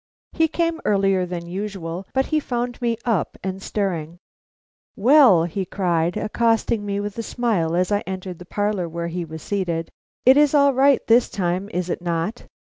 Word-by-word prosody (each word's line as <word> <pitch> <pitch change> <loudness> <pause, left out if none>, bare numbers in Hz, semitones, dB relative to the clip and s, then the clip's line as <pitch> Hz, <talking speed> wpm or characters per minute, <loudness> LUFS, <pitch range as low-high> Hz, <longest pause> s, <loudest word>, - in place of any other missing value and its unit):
He 325 -1 +3
came 335 +1 -1
earlier 195 -3 +2
than 175 -1 -5
usual, 185 -1 -5
but 265 0 +1
he 310 - +1
found 245 -3 -3
me 235 -1 0
up 225 -8 0
and 190 0 -4
stirring. 175 -6 -3 0.8
"Well," 240 - +6
he 175 +3 -2
cried, 175 -2 -1
accosting 225 0 +1
me 200 -1 -2
with 205 +2 -5
a - - 0
smile 215 -9 -1
as 180 +2 +1
I 205 - +3
entered 185 -2 -6
the 180 - -10
parlor 205 -2 -1
where 170 +1 -4
he 175 +1 -3
was 160 -1 -9
seated, 175 -5 -2 0.3
"it 260 +2 +7
is 295 0 +4
all 280 -1 +5
right 270 +1 +3
this 235 +2 +4
time, 185 +1 -2
is 180 -3 -2
it 180 - -3
not? 175 +6 -3
195 Hz, 180 wpm, -22 LUFS, 175-235 Hz, 0.8 s, it